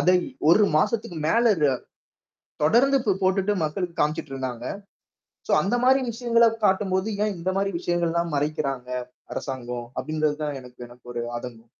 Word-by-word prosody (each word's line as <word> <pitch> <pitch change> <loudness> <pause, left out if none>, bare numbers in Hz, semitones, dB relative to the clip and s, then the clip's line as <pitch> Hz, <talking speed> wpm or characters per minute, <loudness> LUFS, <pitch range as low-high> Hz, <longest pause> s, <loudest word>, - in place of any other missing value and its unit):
அதை 180 0 +5 0.3
1 210 +5 +6
மாசத்துக்கு 175 0 0
மேல 230 +6 +3
அது 150 -3 +3 0.9
தொடர்ந்து 265 - +4
போ - - +4
போட்டுட்டு 190 +2 +2
மக்களுக்கு 170 +2 -3
காமிச்சிட்டு 150 -1 -1
இருந்தாங்க. 125 -2 -4 0.8
சோ, - - +1
அந்த 200 - 0
மாரி 265 +1 +5
விஷயங்களைக் 230 -1 +2
காட்டும்போது, 190 0 +1 0.2
ஏன் 210 -2 -1
இந்த 175 +3 -1
மாரி 195 0 0
விஷயங்கள் 175 -1 0
எல்லாம் 170 -2 -1
மறைக்கிறாங்க 140 -3 -2 0.4
அரசாங்கம்? 125 -3 -5
அப்டிங்கறது 155 -1 0
தான் 145 -2 -3
எனக்கு 125 -1 -15
எனக்கு 120 0 -18
ஒரு 120 - -2 0.2
ஆதங்கம். 120 -2 -9
170 Hz, 145 wpm, -25 LUFS, 135-200 Hz, 0.9 s, 1